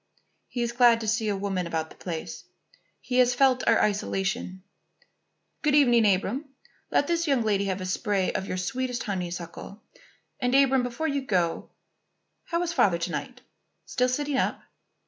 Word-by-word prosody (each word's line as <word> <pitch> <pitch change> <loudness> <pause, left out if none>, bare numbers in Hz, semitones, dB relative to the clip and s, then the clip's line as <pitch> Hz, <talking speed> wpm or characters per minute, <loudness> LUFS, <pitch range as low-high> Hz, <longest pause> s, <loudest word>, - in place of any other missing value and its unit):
"He 240 - -3
is 235 - -1
glad 240 -1 +5
to 220 - -4
see 220 0 0
a 205 - 0
woman 195 -3 -2
about 160 -1 -3
the - - -13
place. 165 -3 -6 0.6
He 250 0 0
has 250 0 +4
felt 255 -1 +3
our 230 - +5
isolation 195 -1 -1 1.0
Good 300 -1 +2
evening, 240 -7 +5
Abram. 210 +10 -1 0.4
Let - - +2
this 335 +1 0
young 270 -5 +2
lady 200 -2 +1
have 190 -1 -2
a - - -4
spray 195 0 0
of 190 - -3
your 185 - -3
sweetest 250 +4 -2
honeysuckle. 180 +1 -6 0.6
And, 250 +1 +1
Abram, 270 -1 +4
before 245 +6 -3
you 280 -2 -1
go, 180 -9 -1 0.8
how 340 0 -1
is 345 -1 -2
Father 185 - +3
to 170 +1 -3
night? 250 - -5 0.4
Still 250 -1 0
sitting 285 +2 -1
up?" - - -1
230 Hz, 165 wpm, -26 LUFS, 190-260 Hz, 1.0 s, glad